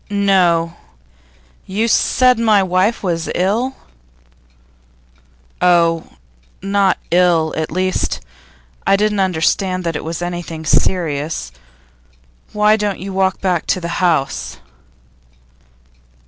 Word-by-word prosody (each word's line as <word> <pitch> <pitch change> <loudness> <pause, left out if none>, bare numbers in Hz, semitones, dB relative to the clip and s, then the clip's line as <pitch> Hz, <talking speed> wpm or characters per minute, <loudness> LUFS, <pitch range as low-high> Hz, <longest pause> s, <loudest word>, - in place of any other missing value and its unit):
'No. 180 -5 +2 0.9
You 215 +4 -1
said 250 +1 +3
my 215 -4 +3
wife 185 +5 0
was 165 -3 -2
ill?' 225 +9 0 1.9
'Oh, 170 -2 +3 0.5
not 195 0 +1
ill. 170 -3 +3
At 160 -1 -2
least, 185 +2 -1 0.7
I - - +5
didn't 210 0 0
understand 185 +1 0
that 165 -2 -2
it - - -4
was 165 +2 -4
anything 175 -2 -5
serious. 155 - 0 1.0
Why 210 +1 +3
don't 205 -3 -2
you 195 +1 -7
walk 190 0 0
back 180 -4 -1
to 185 - +1
the 170 -1 -5
house? 135 - 0
185 Hz, 105 wpm, -17 LUFS, 165-200 Hz, 1.9 s, I